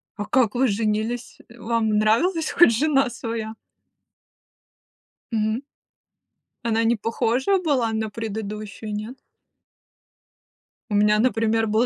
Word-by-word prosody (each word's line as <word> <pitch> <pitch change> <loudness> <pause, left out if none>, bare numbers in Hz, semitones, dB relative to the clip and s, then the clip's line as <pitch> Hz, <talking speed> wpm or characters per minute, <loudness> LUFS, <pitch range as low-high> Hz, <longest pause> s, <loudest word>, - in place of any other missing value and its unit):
А 205 - -4
как 240 -1 +2
вы 260 +2 +3
женились? 220 +2 -2
Вам 230 -1 -1
нравилось 315 - +2
хоть 345 - +6
жена 275 0 +2
своя? 225 -2 -5 1.8
Мгм. 220 +1 0 1.0
Она 230 -1 +1
не 230 +1 +3
похожа 235 - 0
была 275 -10 +1
на 220 0 -2
предыдущую, 215 -1 -6
нет? 215 +5 -5 1.7
У 210 - -1
меня, 210 +1 +4
например, 225 -1 +1
был 220 +3 +2
225 Hz, 105 wpm, -23 LUFS, 215-245 Hz, 1.8 s, хоть